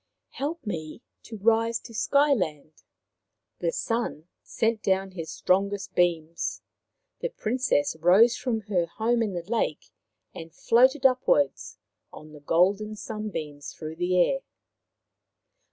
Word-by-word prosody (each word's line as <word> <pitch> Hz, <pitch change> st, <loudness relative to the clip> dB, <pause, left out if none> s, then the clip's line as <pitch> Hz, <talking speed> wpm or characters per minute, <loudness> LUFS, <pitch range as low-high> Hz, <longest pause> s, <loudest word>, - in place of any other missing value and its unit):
" -, -, -58 dB
Help 305 Hz, +1 st, -3 dB
me 160 Hz, 0 st, -5 dB, 0.2 s
to 225 Hz, -, -9 dB
rise 230 Hz, +2 st, +2 dB
to 230 Hz, -, -13 dB
Sky 280 Hz, +5 st, +3 dB
land." 155 Hz, -, -4 dB, 0.8 s
The -, -, 0 dB
Sun 230 Hz, -, -3 dB
sent 225 Hz, -1 st, -1 dB
down 190 Hz, 0 st, 0 dB
his 165 Hz, -4 st, -7 dB
strongest 200 Hz, +3 st, 0 dB
beams. 170 Hz, -2 st, 0 dB, 0.6 s
The -, -, -2 dB
Princess 235 Hz, -, 0 dB
rose 195 Hz, +8 st, +5 dB
from 250 Hz, -3 st, -2 dB
her 185 Hz, -5 st, -1 dB
home 230 Hz, +6 st, 0 dB
in 210 Hz, -4 st, -1 dB
the 175 Hz, -1 st, -4 dB
lake 215 Hz, -7 st, -2 dB, 0.4 s
and 165 Hz, 0 st, -9 dB
floated 260 Hz, +4 st, +3 dB
upwards 150 Hz, -, +2 dB, 0.3 s
on 155 Hz, 0 st, -12 dB
the 150 Hz, -, -11 dB
golden 195 Hz, +8 st, +1 dB
sunbeams 200 Hz, -10 st, -6 dB
through 155 Hz, 0 st, -7 dB
the 180 Hz, +1 st, +1 dB
air. 270 Hz, +10 st, +3 dB
205 Hz, 130 wpm, -26 LUFS, 165-235 Hz, 0.8 s, rose